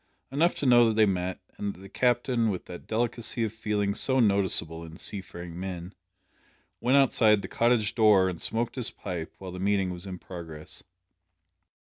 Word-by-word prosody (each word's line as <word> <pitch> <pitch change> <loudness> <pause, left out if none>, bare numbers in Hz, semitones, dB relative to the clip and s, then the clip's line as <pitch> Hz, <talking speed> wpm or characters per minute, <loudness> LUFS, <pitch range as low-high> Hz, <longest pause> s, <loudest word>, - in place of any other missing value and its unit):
Enough 160 +6 +2
to - - -3
know 120 -2 +6
that 110 - +1
they 110 0 +5
met, 95 -2 -1 0.2
and 100 -1 -3
that - - -15
the 95 - -11
Captain 120 +1 +1
with 95 -3 -3
that 90 - -10
delicacy 115 +1 -1
of 110 -1 -2
feeling 105 -2 -1
so 130 +5 +2
noticeable 95 -7 +2
in 80 0 -10
seafaring 85 -3 -7
men 90 0 -6 0.9
went 130 +3 +3
outside 110 -6 +4
the - - -4
cottage 115 -3 +2
door 105 -5 +5
and 90 -3 -4
smoked 115 +3 -2
his 125 - -1
pipe 85 -4 -6
while 95 -1 -8
the 90 - -7
meeting 95 -1 +1
was 90 +1 -7
in 95 -1 -6
progress. 80 -4 -9
100 Hz, 180 wpm, -28 LUFS, 90-115 Hz, 0.9 s, know